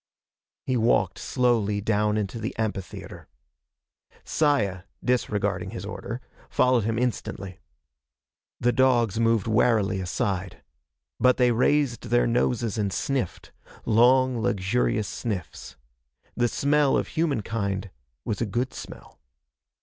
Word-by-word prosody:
He 130 Hz, -, 0 dB
walked 115 Hz, +1 st, +2 dB
slowly 115 Hz, -5 st, +1 dB
down 105 Hz, 0 st, +1 dB
into 105 Hz, +2 st, -3 dB
the 110 Hz, +2 st, -5 dB
amphitheater. 105 Hz, -4 st, -5 dB, 1.0 s
Saya, 110 Hz, -12 st, +1 dB, 0.2 s
disregarding 120 Hz, -4 st, 0 dB
his -, -, -6 dB
order, -, -, -6 dB, 0.3 s
followed 125 Hz, -4 st, +3 dB
him 115 Hz, 0 st, -1 dB
instantly. 100 Hz, -6 st, -3 dB, 1.0 s
The 120 Hz, -, +2 dB
dogs 120 Hz, -5 st, +2 dB
moved 115 Hz, -3 st, +2 dB
warily 110 Hz, -3 st, +2 dB
aside. 95 Hz, 0 st, -3 dB, 0.6 s
But 125 Hz, +1 st, +4 dB
they 125 Hz, -1 st, +4 dB
raised 125 Hz, +1 st, +1 dB
their 120 Hz, +1 st, +3 dB
noses 120 Hz, -2 st, 0 dB
and 100 Hz, -2 st, 0 dB
sniffed 125 Hz, +1 st, -3 dB, 0.3 s
long, 125 Hz, +2 st, +4 dB
luxurious 105 Hz, +1 st, 0 dB
sniffs. 100 Hz, -3 st, -5 dB, 0.6 s
The 120 Hz, -, +2 dB
smell 140 Hz, +3 st, +2 dB
of -, -, -2 dB
humankind 105 Hz, -, -2 dB, 0.3 s
was 105 Hz, 0 st, -2 dB
a 115 Hz, -, 0 dB
good 120 Hz, +5 st, -2 dB
smell. -, -, -11 dB
115 Hz, 110 wpm, -25 LUFS, 100-125 Hz, 1.0 s, But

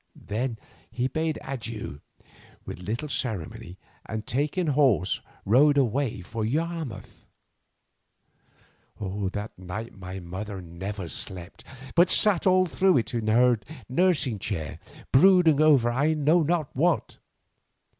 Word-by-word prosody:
Then 115 Hz, +3 st, -3 dB, 0.3 s
he 125 Hz, +1 st, -1 dB
bade 160 Hz, +3 st, -2 dB
him -, -, -12 dB
adieu 115 Hz, -, -6 dB, 0.6 s
with -, -, -7 dB
little 110 Hz, +11 st, -4 dB
ceremony, 110 Hz, -, -4 dB, 0.3 s
and 110 Hz, 0 st, -5 dB
taking 150 Hz, +7 st, -1 dB
horse 130 Hz, -, +2 dB, 0.2 s
rode 145 Hz, +7 st, +5 dB
away 130 Hz, -4 st, 0 dB
for 110 Hz, +5 st, -5 dB
Yarmouth. 160 Hz, +2 st, -4 dB, 1.7 s
That 105 Hz, +1 st, -4 dB
night 95 Hz, +6 st, -6 dB
my 95 Hz, -1 st, -7 dB
mother 95 Hz, +3 st, -6 dB
never 90 Hz, +2 st, -6 dB
slept, 95 Hz, +5 st, -4 dB, 0.3 s
but 175 Hz, +2 st, +5 dB
sat 200 Hz, -4 st, +5 dB
all 185 Hz, 0 st, +5 dB
through 185 Hz, 0 st, +2 dB
it 120 Hz, -, -1 dB
in 115 Hz, -2 st, -2 dB
her 120 Hz, +1 st, +4 dB, 0.3 s
nursing 145 Hz, -, +1 dB
chair, 80 Hz, -7 st, -4 dB, 0.3 s
brooding 165 Hz, -1 st, +5 dB
over 140 Hz, -6 st, +5 dB
I 145 Hz, +6 st, +1 dB
know 155 Hz, +3 st, +3 dB
not 160 Hz, -2 st, -1 dB
what. 165 Hz, +4 st, 0 dB
120 Hz, 120 wpm, -26 LUFS, 105-150 Hz, 1.7 s, rode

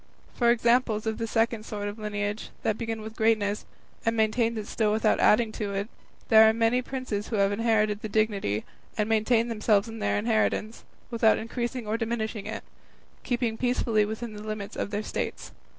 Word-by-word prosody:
For 235 Hz, -1 st, +2 dB
examples 235 Hz, -2 st, +2 dB
of 220 Hz, 0 st, -2 dB
the 230 Hz, -, -2 dB
second 225 Hz, 0 st, 0 dB
sort 205 Hz, -2 st, -4 dB
of 205 Hz, +2 st, -6 dB
lineage, 205 Hz, 0 st, -3 dB
that 215 Hz, -, +1 dB
began 225 Hz, -1 st, -4 dB
with 220 Hz, +1 st, -8 dB
greatness 215 Hz, -2 st, +1 dB, 0.4 s
and 225 Hz, 0 st, 0 dB
maintains 225 Hz, +1 st, +1 dB
it 215 Hz, -, -4 dB
still 215 Hz, 0 st, 0 dB
without 215 Hz, 0 st, +2 dB
adding 220 Hz, +1 st, +4 dB
to 205 Hz, -2 st, -4 dB
it, 200 Hz, +3 st, -2 dB, 0.4 s
there 220 Hz, -1 st, +8 dB
are -, -, +2 dB
the -, -, -7 dB
many 230 Hz, +2 st, +3 dB
princes 255 Hz, -6 st, -4 dB
who 225 Hz, -, -3 dB
have 200 Hz, -1 st, +3 dB
inherited 215 Hz, -1 st, +1 dB
the 215 Hz, -, -5 dB
dignity, 200 Hz, -, 0 dB, 0.3 s
and 210 Hz, -1 st, +1 dB
maintain 225 Hz, +1 st, +2 dB
themselves 215 Hz, -2 st, +2 dB
in 225 Hz, 0 st, -7 dB
their -, -, 0 dB
inheritance, 220 Hz, 0 st, 0 dB, 0.3 s
without 225 Hz, -2 st, +4 dB
increasing 240 Hz, +1 st, -4 dB
or 215 Hz, +2 st, -1 dB
diminishing 220 Hz, -2 st, -3 dB
it, -, -, -5 dB, 0.6 s
keeping 240 Hz, -3 st, -1 dB
peacefully 240 Hz, -3 st, +2 dB
within 220 Hz, +2 st, -4 dB
the 210 Hz, -, -8 dB
limits 215 Hz, -2 st, -5 dB
of -, -, -3 dB
their 205 Hz, +1 st, -2 dB
states. -, -, -4 dB
220 Hz, 185 wpm, -27 LUFS, 210-230 Hz, 0.6 s, there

